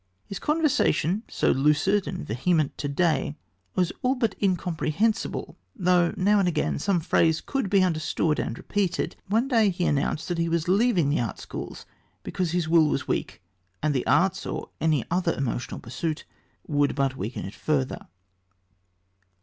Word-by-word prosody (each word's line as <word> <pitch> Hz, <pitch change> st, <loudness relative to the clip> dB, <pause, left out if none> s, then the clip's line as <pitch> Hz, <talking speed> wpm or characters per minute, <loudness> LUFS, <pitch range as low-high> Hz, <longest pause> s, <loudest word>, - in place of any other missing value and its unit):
His 200 Hz, -, -6 dB
conversation, 265 Hz, -, +1 dB
so -, -, +1 dB
lucid 150 Hz, +9 st, +2 dB
and 185 Hz, -, -5 dB
vehement 150 Hz, +6 st, 0 dB
to 145 Hz, -, -2 dB
day, 150 Hz, -1 st, 0 dB, 0.4 s
was 180 Hz, -2 st, +1 dB
all 255 Hz, +2 st, +2 dB
but 230 Hz, -5 st, 0 dB
incomprehensible, 185 Hz, +2 st, -1 dB, 0.2 s
though 180 Hz, -4 st, +3 dB
now 205 Hz, +2 st, +3 dB
and 190 Hz, -, +2 dB
again 160 Hz, -4 st, 0 dB
some 190 Hz, +3 st, +1 dB
phrase 160 Hz, 0 st, +2 dB
could 270 Hz, -8 st, -2 dB
be 195 Hz, -1 st, +4 dB
understood 160 Hz, -2 st, 0 dB
and 115 Hz, -, -3 dB
repeated. 195 Hz, -4 st, -1 dB
One 225 Hz, +6 st, +1 dB
day 225 Hz, -6 st, +4 dB
he 180 Hz, -1 st, -1 dB
announced 145 Hz, +2 st, 0 dB
that 175 Hz, -1 st, -1 dB
he 165 Hz, 0 st, +1 dB
was 165 Hz, 0 st, 0 dB
leaving 190 Hz, -, +3 dB
the 155 Hz, -, +1 dB
Art 115 Hz, -5 st, -2 dB
Schools -, -, -7 dB, 0.4 s
because 180 Hz, -2 st, -2 dB
his 175 Hz, -1 st, 0 dB
will 160 Hz, -1 st, +5 dB
was -, -, -1 dB
weak, -, -, -3 dB, 0.4 s
and 155 Hz, -1 st, +2 dB
the 130 Hz, -, -1 dB
arts 190 Hz, +1 st, +3 dB
or -, -, -4 dB
any 155 Hz, -6 st, +2 dB
other 175 Hz, -1 st, +1 dB
emotional 125 Hz, -2 st, -3 dB
pursuit 155 Hz, +6 st, -4 dB, 0.4 s
would 145 Hz, -1 st, +1 dB
but 135 Hz, -1 st, 0 dB
weaken 115 Hz, 0 st, -5 dB
it 95 Hz, -, -7 dB
further. 140 Hz, -4 st, -2 dB
170 Hz, 160 wpm, -26 LUFS, 150-195 Hz, 0.4 s, will